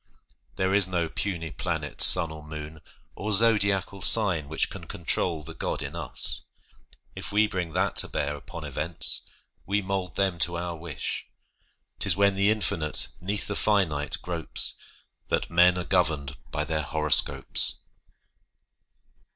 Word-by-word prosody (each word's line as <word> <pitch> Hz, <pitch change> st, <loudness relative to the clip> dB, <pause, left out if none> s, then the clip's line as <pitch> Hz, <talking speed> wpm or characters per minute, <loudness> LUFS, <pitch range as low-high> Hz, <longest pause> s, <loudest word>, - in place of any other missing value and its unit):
There 95 Hz, 0 st, -1 dB
is 100 Hz, -2 st, +5 dB
no 85 Hz, -3 st, -2 dB
puny 85 Hz, -5 st, -4 dB
planet, -, -, -5 dB
sun, 85 Hz, -3 st, +7 dB
or 80 Hz, -1 st, -10 dB
moon, 75 Hz, +1 st, -9 dB, 0.3 s
Or 105 Hz, +2 st, -5 dB
zodiacal 100 Hz, -3 st, +2 dB
sign 95 Hz, -9 st, +4 dB
which 80 Hz, -, -1 dB
can -, -, -9 dB
control 85 Hz, -1 st, -1 dB
The -, -, -10 dB
God -, -, -4 dB
in -, -, -7 dB
us! -, -, -2 dB, 0.7 s
If -, -, -8 dB
we 105 Hz, +1 st, +3 dB
bring 90 Hz, -5 st, -5 dB
that 95 Hz, +2 st, -1 dB
to -, -, +6 dB
bear 75 Hz, 0 st, -3 dB
Upon 85 Hz, +3 st, -10 dB
events, 75 Hz, +3 st, +1 dB, 0.5 s
we 100 Hz, +2 st, 0 dB
mould 95 Hz, -2 st, -4 dB
them 95 Hz, -3 st, -1 dB
to 85 Hz, +1 st, +2 dB
our 85 Hz, 0 st, -5 dB
wish; 80 Hz, -4 st, -5 dB, 0.7 s
'Tis -, -, +4 dB
when 100 Hz, 0 st, +3 dB
the 100 Hz, +1 st, +1 dB
infinite 85 Hz, -7 st, +1 dB
'neath 100 Hz, +3 st, -2 dB
the 105 Hz, -, -4 dB
finite 85 Hz, -10 st, 0 dB
gropes 85 Hz, -3 st, +2 dB, 0.5 s
That -, -, -2 dB
men 90 Hz, +1 st, +4 dB
are 90 Hz, -, -3 dB
governed 80 Hz, -7 st, -1 dB
by 75 Hz, -, -3 dB
their 80 Hz, 0 st, -3 dB
horoscopes. 75 Hz, 0 st, +3 dB
85 Hz, 145 wpm, -25 LUFS, 80-100 Hz, 0.7 s, sun